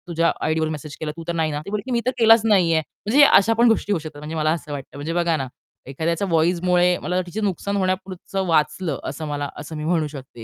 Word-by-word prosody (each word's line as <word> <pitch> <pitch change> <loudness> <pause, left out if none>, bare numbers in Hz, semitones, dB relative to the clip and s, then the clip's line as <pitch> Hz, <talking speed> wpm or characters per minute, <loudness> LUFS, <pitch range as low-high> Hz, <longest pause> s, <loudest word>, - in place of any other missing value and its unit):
तुझ्या 170 -1 +1
आयडीवर 155 0 0
मेसेज 150 -1 -6
केला 155 -1 -3
तू 165 - -7
तर 170 - -1
नाही 160 -2 0
ना. 145 0 -3
ती - - -7
म्हणली, 210 +5 -4
मी 240 - +2
तर 255 - +2
केलाच 225 -1 +6
नाहीये. 180 -7 +4 0.3
म्हणजे 275 +7 +6
अशा 225 -3 +5
पण 235 +2 +4
गोष्टी 225 -2 +1
होऊ 195 - +1
शकतात. 155 -1 -9
म्हणजे 150 +2 -6
मला 155 0 +1
असं 155 -2 -4
वाटतं, 140 -1 -7
म्हणजे 150 +3 -4
बघा 170 -1 +1
ना, 135 -2 -3 0.4
एखाद्याच्या 165 +7 -2
व्हॉईसमुळे 175 +1 +2
मला 180 +1 -1
तिचे 205 +5 -5
नुकसान 200 0 -2
होण्यापुरतं 190 0 -2
वाचलं 165 +2 0
असं 155 +3 -5
मला 145 -1 -3
असं 160 - -7
मी 150 - -5
म्हणू 160 -1 +1
शकते 135 -5 -10
170 Hz, 230 wpm, -22 LUFS, 155-190 Hz, 0.4 s, केलाच